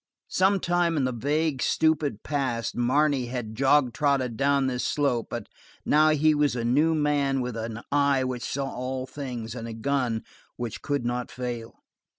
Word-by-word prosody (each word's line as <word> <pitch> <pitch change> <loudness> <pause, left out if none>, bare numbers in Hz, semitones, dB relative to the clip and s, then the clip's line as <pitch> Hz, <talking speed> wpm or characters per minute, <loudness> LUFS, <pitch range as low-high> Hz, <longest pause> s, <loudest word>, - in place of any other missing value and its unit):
Sometime 175 -3 +2
in 140 - +1
the 130 - +1
vague, 145 +3 0
stupid 150 -8 +1
past 130 -6 -2
Marne 130 +1 +2
had 120 -3 -4
jog 135 +1 +3
trotted 135 -3 +1
down 140 +1 +2
this 125 -1 -1
slope, 130 -6 0
but - - -4 0.4
now 155 +1 +5
he 155 0 +4
was 145 -3 +2
a 115 -1 -2
new 150 +7 +3
man 145 -3 +1
with 125 -2 -3
an 115 0 -5
eye 140 -2 +3
which 130 -1 -3
saw 140 0 -2
all 130 +1 -3
things 125 -5 -6
and 115 -2 -6
a 115 - -6
gun 120 -1 -1 0.3
which 120 -3 -5
could 145 -4 -1
not 120 0 -2
fail. 120 -2 -6
130 Hz, 165 wpm, -26 LUFS, 120-145 Hz, 0.4 s, now